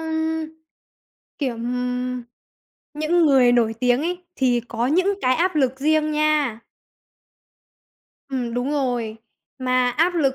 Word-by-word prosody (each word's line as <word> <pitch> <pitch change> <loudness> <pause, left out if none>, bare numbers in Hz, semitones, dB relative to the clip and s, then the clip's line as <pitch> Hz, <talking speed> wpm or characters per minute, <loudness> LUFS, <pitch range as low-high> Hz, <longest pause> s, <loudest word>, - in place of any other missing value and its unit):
ưm, 320 0 -2 0.9
kiểu, 265 -5 -1
ừm, 250 +1 -3 0.7
những 315 +3 +2
người 260 -4 +5
nổi 230 -2 +2
tiếng 250 0 +3
ấy 355 +2 -3
thì 245 -2 +2
có 235 +1 -1
những 370 +8 +2
cái 255 0 +3
áp 360 +4 +1
lực 265 -2 +1
riêng 310 +1 +2
nha. 300 -6 +1 1.7
Ừm, 245 -3 -3
đúng 245 +3 -1
rồi, 245 -6 -1 0.4
mà 255 -1 +1
áp 330 +8 +1
lực 275 -6 +2
265 Hz, 130 wpm, -22 LUFS, 245-310 Hz, 1.7 s, người